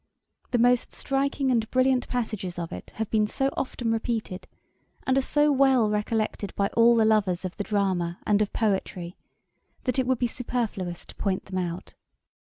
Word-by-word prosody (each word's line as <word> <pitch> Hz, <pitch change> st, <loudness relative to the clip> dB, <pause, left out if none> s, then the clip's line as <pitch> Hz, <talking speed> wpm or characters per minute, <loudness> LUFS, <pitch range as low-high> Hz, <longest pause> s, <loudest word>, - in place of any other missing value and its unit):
The 245 Hz, -, +1 dB
most 245 Hz, +1 st, +3 dB
striking 275 Hz, 0 st, 0 dB
and 225 Hz, -2 st, +1 dB
brilliant 255 Hz, -1 st, +2 dB
passages 215 Hz, -7 st, -3 dB
of 170 Hz, -1 st, -4 dB
it 90 Hz, -, -8 dB
have 220 Hz, -1 st, -3 dB
been 215 Hz, -1 st, +3 dB
so 270 Hz, +5 st, 0 dB
often 240 Hz, -3 st, -2 dB
repeated, 225 Hz, -4 st, -2 dB, 0.6 s
and 260 Hz, -, +2 dB
are 270 Hz, -, +4 dB
so 295 Hz, +2 st, +2 dB
well 265 Hz, -5 st, +4 dB
recollected 210 Hz, -1 st, -1 dB
by 200 Hz, 0 st, +1 dB
all 235 Hz, +1 st, +5 dB
the 225 Hz, -1 st, +4 dB
lovers 200 Hz, -5 st, +2 dB
of 185 Hz, -, -5 dB
the 205 Hz, -, -2 dB
drama 185 Hz, -5 st, 0 dB
and 210 Hz, 0 st, +3 dB
of 210 Hz, -, 0 dB
poetry, 190 Hz, -5 st, -1 dB, 0.7 s
that 255 Hz, +1 st, 0 dB
it 255 Hz, -, +1 dB
would 260 Hz, -1 st, +2 dB
be 245 Hz, -, 0 dB
superfluous 225 Hz, -8 st, -3 dB
to -, -, -14 dB
point 190 Hz, -2 st, -1 dB
them 185 Hz, -1 st, -3 dB
out. 175 Hz, -1 st, -4 dB
220 Hz, 175 wpm, -26 LUFS, 195-250 Hz, 0.7 s, all